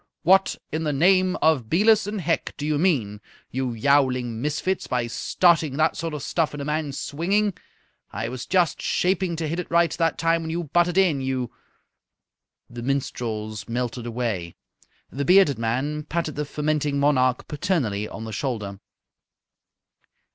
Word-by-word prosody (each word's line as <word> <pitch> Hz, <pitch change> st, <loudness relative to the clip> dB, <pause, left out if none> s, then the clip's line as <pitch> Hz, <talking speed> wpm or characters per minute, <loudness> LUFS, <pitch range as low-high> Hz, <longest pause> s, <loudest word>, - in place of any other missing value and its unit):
What 190 Hz, +3 st, +4 dB, 0.2 s
in 155 Hz, -, -2 dB
the 150 Hz, -, 0 dB
name 185 Hz, +5 st, +3 dB
of 145 Hz, -8 st, +3 dB
Belus 210 Hz, +4 st, +4 dB
and 205 Hz, -1 st, -3 dB
Hec 170 Hz, 0 st, -1 dB
do 145 Hz, -, -4 dB
you 150 Hz, -1 st, 0 dB
mean, 120 Hz, -, +1 dB, 0.3 s
you 130 Hz, -1 st, -2 dB
yowling 125 Hz, -2 st, +1 dB
misfits, 155 Hz, +6 st, -1 dB
by 125 Hz, -2 st, 0 dB
starting 155 Hz, +3 st, +2 dB
that 155 Hz, 0 st, +2 dB
sort 165 Hz, -2 st, -4 dB
of 145 Hz, -, -6 dB
stuff 165 Hz, -3 st, 0 dB
when 145 Hz, -, -6 dB
a 140 Hz, -, -4 dB
man's 150 Hz, -2 st, -2 dB
swinging? 195 Hz, +7 st, 0 dB, 0.6 s
I 110 Hz, +3 st, -3 dB
was 125 Hz, +1 st, -6 dB
just 180 Hz, -3 st, +2 dB
shaping 185 Hz, -1 st, 0 dB
to 160 Hz, -1 st, -3 dB
hit 165 Hz, +3 st, -2 dB
it 180 Hz, -, -5 dB
right 170 Hz, 0 st, +3 dB
that 165 Hz, -1 st, 0 dB
time 165 Hz, 0 st, +2 dB
when 160 Hz, -, -5 dB
you 170 Hz, +2 st, -2 dB
butted 175 Hz, +3 st, +1 dB
in, 170 Hz, -8 st, +3 dB
you 130 Hz, -2 st, -2 dB, 0.6 s
" -, -, -63 dB
The 120 Hz, 0 st, -7 dB
minstrels 115 Hz, -5 st, -3 dB
melted 120 Hz, 0 st, -3 dB
away. 110 Hz, -8 st, -3 dB, 0.6 s
The 140 Hz, -, -3 dB
bearded 180 Hz, -, +5 dB
man 135 Hz, +7 st, -1 dB
patted 160 Hz, -1 st, -2 dB
the 150 Hz, +1 st, -2 dB
fermenting 150 Hz, -1 st, -1 dB
monarch 130 Hz, -3 st, +2 dB
paternally 135 Hz, -, -1 dB
on 110 Hz, -, -7 dB
the 110 Hz, -1 st, -6 dB
shoulder. 105 Hz, -6 st, -3 dB
150 Hz, 160 wpm, -24 LUFS, 125-170 Hz, 0.6 s, bearded